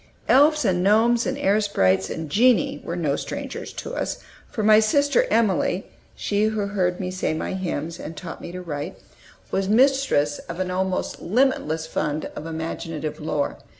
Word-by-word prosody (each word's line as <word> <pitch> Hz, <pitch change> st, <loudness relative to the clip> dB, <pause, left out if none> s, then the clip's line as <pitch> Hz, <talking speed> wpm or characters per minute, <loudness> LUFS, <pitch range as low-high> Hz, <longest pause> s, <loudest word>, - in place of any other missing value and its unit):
Elves 300 Hz, +1 st, +5 dB
and 180 Hz, -3 st, +2 dB
gnomes 225 Hz, +5 st, +3 dB
and 265 Hz, +1 st, -2 dB
air 215 Hz, -6 st, +2 dB
sprites 95 Hz, -, +2 dB
and 160 Hz, -1 st, -4 dB
genii 225 Hz, -, +3 dB
were 170 Hz, -, -4 dB
no 155 Hz, -5 st, 0 dB
strangers -, -, -5 dB
to -, -, -6 dB
us, -, -, -2 dB, 0.3 s
for 215 Hz, -, -3 dB
my 215 Hz, 0 st, +7 dB
sister 285 Hz, -, +3 dB
Emilie 195 Hz, -4 st, +1 dB, 0.3 s
she 205 Hz, +1 st, 0 dB
who 215 Hz, -1 st, 0 dB
heard 180 Hz, -3 st, 0 dB
me 185 Hz, -1 st, -3 dB
say 185 Hz, -4 st, -1 dB
my 160 Hz, -, -3 dB
hymns, 170 Hz, -3 st, -3 dB
and 160 Hz, 0 st, -7 dB
taught 170 Hz, -3 st, -7 dB
me -, -, -7 dB
to 180 Hz, 0 st, -7 dB
write 150 Hz, +1 st, -5 dB, 0.5 s
was 195 Hz, 0 st, 0 dB
mistress 245 Hz, -, +3 dB
of 170 Hz, +2 st, -5 dB
an 185 Hz, -1 st, -1 dB
almost 185 Hz, 0 st, -2 dB
limitless 180 Hz, -, +1 dB
fund 150 Hz, -1 st, -2 dB
of 155 Hz, -, -6 dB
imaginative 160 Hz, -1 st, -4 dB
lore. 150 Hz, -2 st, -2 dB
185 Hz, 170 wpm, -23 LUFS, 160-220 Hz, 0.5 s, my